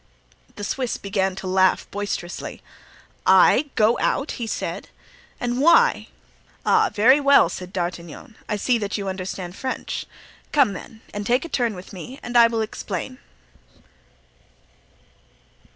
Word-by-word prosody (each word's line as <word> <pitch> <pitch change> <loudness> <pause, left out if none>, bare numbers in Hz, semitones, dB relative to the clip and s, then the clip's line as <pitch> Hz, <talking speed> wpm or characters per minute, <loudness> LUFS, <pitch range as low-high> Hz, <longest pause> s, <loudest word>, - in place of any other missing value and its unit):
The 205 - -7
Swiss 250 +3 -2
began 195 -1 -1
to 190 - -8
laugh 185 0 +2
boisterously. 200 -4 -5 0.6
"I 295 - +5
go 220 +2 +3
out?" 280 - 0
he 230 - -2
said. - - -4 0.5
"And 245 +1 -1
why?" 405 +11 +4 0.6
"Ah, 440 -1 +4
very 255 +7 +5
well!" 280 -1 +5
said 180 0 -7
D'Artagnan; 175 +2 -5
"I 210 - 0
see 235 +3 +1
that 205 0 -3
you 200 -1 -4
understand 185 -1 -5
French. 260 +3 -4 0.4
Come 275 -9 +3
then, 220 +4 -10
and 205 - -4
take 245 +8 +1
a - - -8
turn 235 -7 0
with 180 +2 -11
me 250 +9 -9
and 245 - -6
I 235 -1 +8
will 230 -1 -1
explain." 215 +3 -5
215 Hz, 135 wpm, -23 LUFS, 190-255 Hz, 0.6 s, I